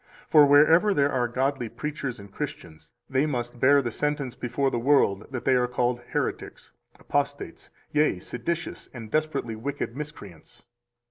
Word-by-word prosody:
For 150 -2 +7
wherever 165 +8 +5
there 140 0 +3
are 125 -2 +1
godly 130 0 -1
preachers 140 -4 -5
and 100 -1 -12
Christians, 85 - -7 0.2
they 135 +2 +1
must 120 -3 -4
bear 140 +2 +5
the 120 - -2
sentence 145 -3 -2
before 135 +3 -1
the 120 - -1
world 115 -6 +2
that 130 -2 -6
they 135 - +4
are 125 -1 +2
called 125 0 0
heretics, - - -3 0.3
apostates, - - -3 0.2
yea, 150 -9 +2
seditious 140 - -4
and 115 -3 -8
desperately 150 -7 -1
wicked 130 +1 -4
miscreants. 120 - -10
130 Hz, 150 wpm, -26 LUFS, 120-145 Hz, 0.3 s, For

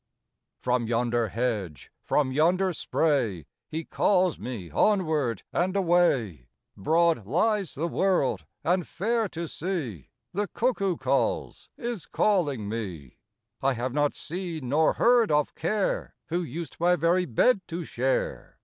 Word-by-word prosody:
From 125 -2 +1
yonder 120 0 +1
hedge, 105 -8 -3
from 140 -3 +1
yonder 180 +6 +2
spray, 120 - 0 0.2
He 160 +1 -3
calls 185 -4 +2
me 105 -10 -6
onward 155 - +1
and 185 +2 0
away; 165 - +2 0.3
Broad 160 - +2
lies 195 - +1
the 160 +4 -1
world 180 -7 +1 0.2
and 180 0 +1
fair 225 +3 0
to 170 0 -5
see. 150 - -4 0.2
The 205 +2 -1
eucboo 200 -7 0
calls - - -1
— - - -30
^is 235 -6 -4
calling 145 - +1
me! 95 - -6 0.4
I 135 0 +2
have 125 +1 -3
not 145 0 +1
seen 165 -6 -5
nor 155 +4 +3
heard 240 -1 +4
of 150 -1 +2
Care, 200 +5 -1
Who 175 +2 0
used 165 +1 -6
my 175 +1 +4
very 175 +3 +2
bed 190 - +3
to 170 +1 -4
share. - - -2
165 Hz, 135 wpm, -27 LUFS, 125-185 Hz, 0.4 s, heard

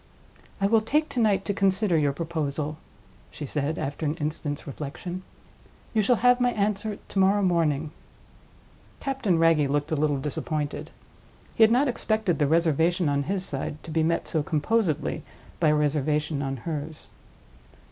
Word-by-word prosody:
"I 195 - +1
will 220 +2 +4
take 300 +8 +1
to 250 - -3
night 200 -4 +2
to 205 - 0
consider 195 -1 +2
your 145 -3 +3
proposal," 155 -1 -3 0.5
she 150 - -7
said, 150 +3 -2
after 145 +3 -4
an 150 0 0
instant's 150 -2 -4
reflection. 155 +6 -6 0.7
"You 220 - +3
shall 245 +4 +3
have 245 +2 +4
my 245 - +4
answer 205 0 -1
to 195 - -2
morrow 195 +2 +4
morning." 160 -4 +1 1.1
Captain 260 -10 0
Wragge 165 -3 +4
looked 145 +3 -1
a - - +2
little 150 -1 +1
disappointed. 150 +1 -3 0.6
He - - -3
had 220 - +8
not 260 +5 +4
expected 220 -7 0
the 145 - +3
reservation 165 +2 +2
on 140 0 +1
his 190 -1 0
side 145 +2 -4
to 160 - -8
be 160 +1 +1
met 165 +1 0
so 160 - 0
composedly 160 +2 0 0.4
by 165 - +3
a 150 - +4
reservation 150 0 0
on 135 -1 -2
hers. 155 -1 -4
160 Hz, 160 wpm, -26 LUFS, 150-200 Hz, 1.1 s, had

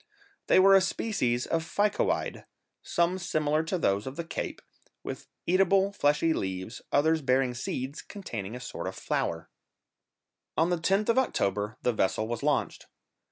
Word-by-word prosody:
They - - +5
were 195 +1 +7
a 195 - +7
species 130 - 0
of 165 -1 0
ficoide, 205 +5 0 0.4
some 175 +2 0
similar 155 -3 +1
to 185 +3 -1
those 100 - 0
of 130 - -5
the 170 - -3
Cape, 165 - -5 0.4
with - - -6 0.2
eatable 195 +2 +3
fleshy 150 -1 +2
leaves, 95 +1 -4
others 160 +2 +3
bearing 130 -1 +2
seeds 130 +3 -4
containing 115 - -6
a - - -6
sort 125 - -6
of - - -5
flour. 80 -1 -2 1.1
On 165 +3 +3
the 175 - +2
10th 195 +6 +1
of 230 - +5
October 105 - -1
the 125 - +2
vessel 110 +1 0
was 120 -1 -3
launched. - - -1
155 Hz, 155 wpm, -28 LUFS, 120-185 Hz, 1.1 s, were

